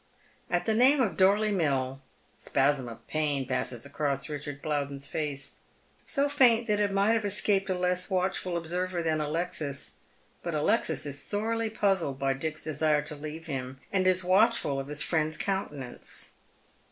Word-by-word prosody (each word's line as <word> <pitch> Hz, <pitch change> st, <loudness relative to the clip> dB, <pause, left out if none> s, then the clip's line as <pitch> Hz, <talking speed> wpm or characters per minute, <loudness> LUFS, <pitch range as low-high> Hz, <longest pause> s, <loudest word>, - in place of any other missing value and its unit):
At 175 Hz, -, 0 dB
the 220 Hz, -, +2 dB
name 260 Hz, +6 st, +5 dB
of 230 Hz, -7 st, +1 dB
Dorley 205 Hz, +3 st, +4 dB
^Mill 135 Hz, -8 st, 0 dB
a -, -, -22 dB, 0.4 s
spasm 135 Hz, -2 st, +1 dB
of 115 Hz, -, -10 dB
pain 145 Hz, -3 st, 0 dB
passes 125 Hz, -2 st, -2 dB
across 140 Hz, -1 st, -2 dB
Eichard 145 Hz, -1 st, -5 dB
Plowden's 140 Hz, -2 st, -2 dB
face 145 Hz, -2 st, -3 dB, 0.2 s
— -, -, -35 dB
so 280 Hz, -1 st, +2 dB
faint 245 Hz, -5 st, +5 dB
that 210 Hz, -2 st, +1 dB
it 205 Hz, -1 st, +2 dB
might 200 Hz, +2 st, +3 dB
have 225 Hz, -1 st, +1 dB
escaped 200 Hz, -1 st, +1 dB
a 185 Hz, -, 0 dB
less 180 Hz, +1 st, 0 dB
watchful 185 Hz, -1 st, 0 dB
observer 175 Hz, +1 st, -2 dB
than 155 Hz, -1 st, +1 dB
Alexis. 150 Hz, -2 st, -3 dB, 0.4 s
But -, -, -3 dB
Alexis -, -, +1 dB
is 145 Hz, 0 st, -3 dB
sorely 225 Hz, +4 st, -1 dB
puzzled 195 Hz, -10 st, 0 dB
by 135 Hz, 0 st, +1 dB
Dick's 155 Hz, +3 st, -3 dB
desire 155 Hz, -1 st, +1 dB
to 150 Hz, -, -5 dB
leave 155 Hz, +2 st, -7 dB
him, 130 Hz, -4 st, -5 dB
and 185 Hz, -1 st, +2 dB
is 185 Hz, 0 st, +3 dB
watchful 185 Hz, -6 st, +3 dB
of 135 Hz, -, -5 dB
his 150 Hz, +1 st, 0 dB
fiiend'a 155 Hz, -1 st, 0 dB
countenance. 145 Hz, -10 st, -3 dB
160 Hz, 165 wpm, -29 LUFS, 140-195 Hz, 0.4 s, name